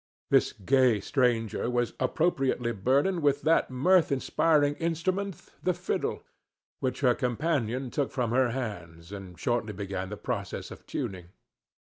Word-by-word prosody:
This - - +4
gay 125 +1 +3
stranger 120 0 0
was 120 -1 0
appropriately 130 -4 +1
burdened 135 - +1
with 145 -1 +2
that 160 +2 +3
mirth 165 +7 +3
inspiring 145 +2 +2
instrument 180 +3 -1 0.2
the 180 -1 +1
fiddle, - - -2 0.6
which 130 0 -2
her 125 -3 +5
companion 130 -2 -1
took 140 +1 0
from 125 -4 -1
her 130 0 +3
hands, 90 -9 -6
and 95 -3 -8
shortly 120 -2 -1
began 95 -1 -4
the 105 - -6
process 105 -6 -4
of - - -12
tuning. 90 -3 -4
125 Hz, 135 wpm, -28 LUFS, 110-145 Hz, 0.6 s, her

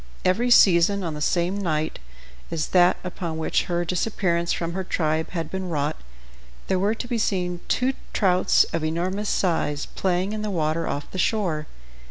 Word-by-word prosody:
Every 225 +7 +2
season, 195 -2 +5
on 165 -3 -3
the 150 - -6
same 175 +5 +1
night 155 -5 -1 0.5
as 160 -2 -2
that 180 0 +5
upon 175 -3 -4
which 160 - 0
her 175 0 -1
disappearance 170 -1 0
from 170 0 -2
her 190 +1 -2
tribe 160 -3 -1
had 165 -3 -4
been 190 -1 -4
wrought, 150 -1 -1 0.7
there 185 - 0
were 205 +4 +1
to 245 - -6
be 235 -1 -1
seen 180 -4 -1
two 255 +2 +1 0.2
trouts 185 -3 +3
of 165 -1 -1
enormous 185 +6 -1
size 150 -5 0
playing 185 +2 -1
in 215 - -3
the 210 - -2
water 165 -2 -1
off 145 +1 -4
the 185 - -5
shore. 175 -7 0
175 Hz, 175 wpm, -24 LUFS, 160-190 Hz, 0.7 s, season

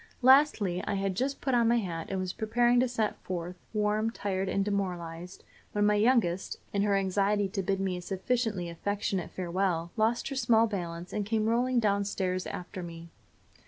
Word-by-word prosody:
Lastly, 250 -9 +5
I 205 - 0
had 195 -1 -1
just 265 +8 -2
put 265 - 0
on 235 -1 +4
my 235 +1 +4
hat, 170 -7 -3
and 195 - -2
was 185 -1 -3
preparing 240 +2 +2
to 255 - +3
set 225 -3 -1
forth, 180 -1 -5 0.2
warm, 215 +1 +1
tired 195 -4 -2
and 195 0 0
demoralized, 180 -3 -4 0.3
when 205 0 +2
my 210 - +4
youngest, 210 -5 +2 0.2
in 200 - +1
her 200 -1 +2
anxiety 195 +1 +1
to 195 0 -2
bid 195 +1 -1
me 190 -2 -1
a - - -6
sufficiently 200 0 -1
affectionate 195 +1 -2
farewell, 175 -2 -1
lost 230 +3 +1
her 275 - -4
small 230 -3 +4
balance, 175 -4 -5
and 205 -1 -2
came 220 0 +1
rolling 245 +2 +2
down 200 -2 +2
stairs 185 -2 -2
after 180 +1 -6
me. 170 -1 -8
200 Hz, 185 wpm, -29 LUFS, 180-225 Hz, 0.3 s, Lastly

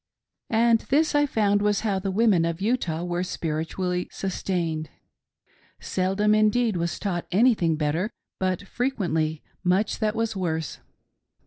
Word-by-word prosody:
And 230 0 +4
this 305 +3 +3
I 290 0 +3
found 205 -5 +2
was 205 -1 +1
how 205 -3 0
the 195 +1 -3
women 200 -3 +3
of 165 0 -1
Utah 195 -7 -1
were 175 0 -2
spirit 160 -3 -3
ually 180 -1 -1
sustained. 170 -5 -2 0.9
Seldom, 195 +3 +1
indeed, 215 +1 +3
was 170 0 -1
taught 175 -4 -3
anything 195 -6 +3
better, 155 +6 0 0.3
but 185 0 -1
frequently 175 - -1 0.2
much 190 +4 +1
that 215 0 0
was 225 -1 -1
worse. 160 -5 -2
190 Hz, 135 wpm, -25 LUFS, 170-215 Hz, 0.9 s, And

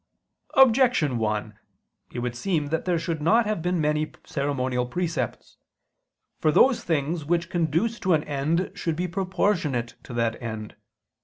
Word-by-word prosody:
Objection 240 - +4
1: 105 -1 -2 0.5
It 120 - -5
would 120 0 -3
seem 155 0 -1
that 160 +1 -1
there 180 -2 +1
should 165 -2 -3
not 225 +9 +4
have 210 -5 -1
been 180 +1 0
many 150 0 0
ceremonial 130 -3 -1
precepts. 175 +4 -3 0.8
For 155 - +3
those 255 - +4
things 160 0 -1
which 170 +3 -1
conduce 175 +7 0
to 185 -3 +3
an 155 - 0
end 150 +5 -1
should 165 -2 -2
be 180 +3 -1
proportionate 175 - 0
to - - -9
that 115 -1 -1
end. 110 -3 -6
160 Hz, 150 wpm, -25 LUFS, 130-180 Hz, 0.8 s, Objection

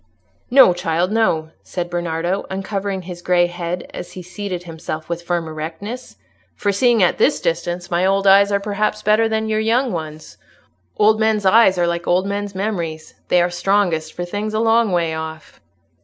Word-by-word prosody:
"No, 255 -7 +7
child, 175 +1 -1
no," 165 -8 +1
said 175 -1 -4
Bernardo, 175 +1 -2
uncovering 195 0 -3
his 175 -1 -8
grey 175 0 +3
head, 175 0 -4
as - - -8
he 185 - -8
seated 180 -1 -5
himself 160 -2 -6
with 170 0 -4
firm 170 -1 -2
erectness. 165 +10 -7 0.4
"For 205 - 0
seeing 230 +1 +3
at 175 - +2
this - - +3
distance, 175 +1 -2
my 175 +1 +1
old 195 +1 +2
eyes 200 +1 +6
are 200 - +2
perhaps 210 +1 -2
better 215 +2 +3
than 220 0 -1
your 215 0 0
young 235 +4 +1
ones. 155 -3 -7 0.6
Old 215 +1 +4
men's 220 -2 +1
eyes 190 -1 +5
are 175 - +2
like 170 0 -2
old 180 +2 +2
men's 200 0 -4
memories; 170 -6 -4
they 175 -1 +4
are 175 - -1
strongest 175 -4 0
for 175 - -4
things 210 +4 -4
a - - +1
long 225 -1 +3
way 170 -2 0
off." 160 0 -7
185 Hz, 180 wpm, -19 LUFS, 170-210 Hz, 0.6 s, No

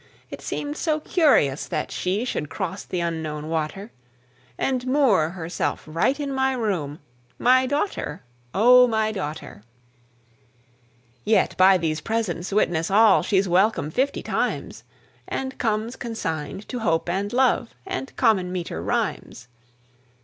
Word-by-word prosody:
It - - -7
seemed 295 +1 -4
so 310 -2 0
curious 280 - +2
that - - -3
she 195 +6 -1
Should 150 - -3
cross 185 0 -4
the 180 - -3
Unknown 160 -2 -3
water, 165 +7 -3 0.7
And 255 -1 -1
moor 255 - +3
herself 170 -1 -3
right 165 - 0
in 280 -2 -3
my 265 0 +1
room, 185 - -2 0.4
My 255 +1 +4
daughter, 285 - -2 0.3
O 250 +5 +6
my 220 -2 0
daughter! 155 - -6 1.6
Yet 215 +1 +2
by 190 0 +6
these 160 -2 -2
presents 195 -4 -2
witness 170 -5 +1
all 210 +1 +5
She's 195 -1 +1
welcome 185 -3 +2
fifty 270 - -1
times, - - -2 0.4
And 265 0 -4
comes 225 +1 -1
consigned 195 - -5
to 250 - -4
Hope 165 -8 0
and 195 +4 -1
Love 250 -2 +1
And 370 -8 -4
common 200 -7 +2
meter 170 - -4
rhymes. 125 +7 -3
205 Hz, 130 wpm, -24 LUFS, 165-250 Hz, 1.6 s, O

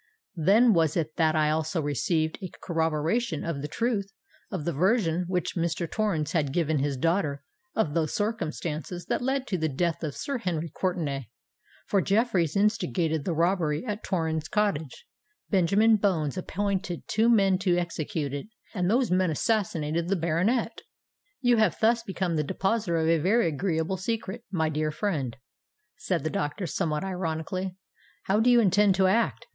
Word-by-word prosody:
Then 210 +8 +5
was 160 -3 +2
it 155 -2 -2
that 160 -2 +3
I 155 -1 +3
also 160 +2 -1
received 155 - 0
a 185 - -5
corroboration 165 +3 0
of 165 -5 -3
the 150 - -3
truth 200 - -1 0.4
of 180 -7 -4
the 170 - -1
version 180 - +2
which 180 -1 -2
Mr. 170 0 -1
Torrens 190 -7 -1
had 150 -5 0
given 160 -1 +1
his 140 0 -1
daughter 150 -2 0 0.3
of 165 -10 +1
those 160 -2 0
circumstances 175 - -3
that - - 0
led 265 +1 0
to 190 -8 -2
the 160 0 0
death 165 +4 -1
of 150 -3 -3
Sir 275 -3 -3
Henry 170 -6 -2
Courtenay; 155 - -2 0.6
for 200 - +2
Jeffreys 200 - +1
instigated 165 - +1
the 170 - -1
robbery 170 +1 +1
at 210 -2 -3
Torrens 160 -4 -1
Cottage—Benjamin 205 - 0
Bones 170 -8 0
appointed 190 -1 -2
two 225 +2 +2
men 195 -5 +4
to 180 -2 +2
execute 165 -3 -3
it—and 180 +3 -4
those 240 +1 +2
men 185 -1 +3
assassinated 165 -3 0
the 195 - +1
baronet." 185 +8 0 0.6
"You 245 -2 +4
have 215 -6 +2
thus 230 +1 +3
become 185 -5 -2
the 150 - +1
depositor 195 +3 0
of 160 0 +1
a 165 0 +3
very 195 +5 +3
agreeable 160 +3 -1
secret, 225 +3 -3
my 165 -5 0
dear 155 0 -1
friend," 150 - -2 0.6
said 180 -3 -2
the 155 - -1
doctor, 145 +7 -2
somewhat 150 -1 -1
ironically. 185 0 -3 0.5
"How 200 +2 +2
do 235 +3 +4
you 240 -1 +6
intend 200 -1 +4
to 190 0 +3
act? 225 +5 +1
175 Hz, 160 wpm, -27 LUFS, 155-205 Hz, 0.6 s, you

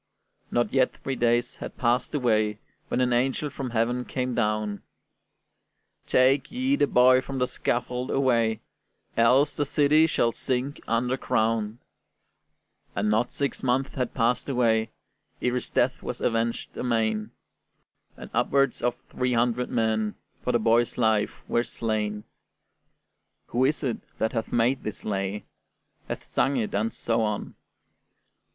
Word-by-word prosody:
Not 120 0 0
yet 130 -1 +2
three 135 - -4
days 120 0 +1
had - - -8
passed 125 +4 +1
away, 110 -5 +1 0.3
When 130 - 0
an 125 -1 +2
angel 135 +4 0
from 135 -2 -4
heaven 120 +2 0
came 125 0 -3
down: 105 -2 -1 1.3
"Take 130 +2 +3
ye 260 +3 +1
the 145 - +2
boy 130 0 +5
from 135 +1 -6
the 125 - +2
scaffold 125 0 -2
away; 115 -5 +2 0.5
Else 125 +5 +4
the 145 - +1
city 150 +2 +4
shall 115 -6 +1
sink 130 +4 -2
under 125 +3 +1
ground!" 110 -2 0 1.2
And 105 +2 +1
not 110 +3 +1
six 140 -3 -2
months 130 +2 0
had 125 -2 -3
passed 125 +2 +1
away, 115 -4 +2 0.5
Ere 125 - 0
his 125 - -2
death - - +1
was - - -5
avenged 115 0 -1
amain; 110 -3 0 0.9
And - - -10
upwards 140 -2 +2
of 120 0 +1 0.2
three 125 0 0
hundred 120 +1 +1
men 110 -2 0 0.3
For - - +1
the - - +3
boy's 115 +1 +2
life 110 -3 +1
were 120 - +2
slain. 110 -3 -2 1.3
Who 125 +2 +2
is 150 +3 0
it 125 -4 -1 0.2
that 110 - 0
hath 115 -2 -3
made 120 +3 +2
this 105 - -6
lay, 100 0 -2 0.6
Hath - - -5
sung 135 +1 +1
it, 110 -3 -2
and 110 +3 0
so 115 0 -1
on? 105 -2 -2
120 Hz, 145 wpm, -26 LUFS, 110-130 Hz, 1.3 s, boy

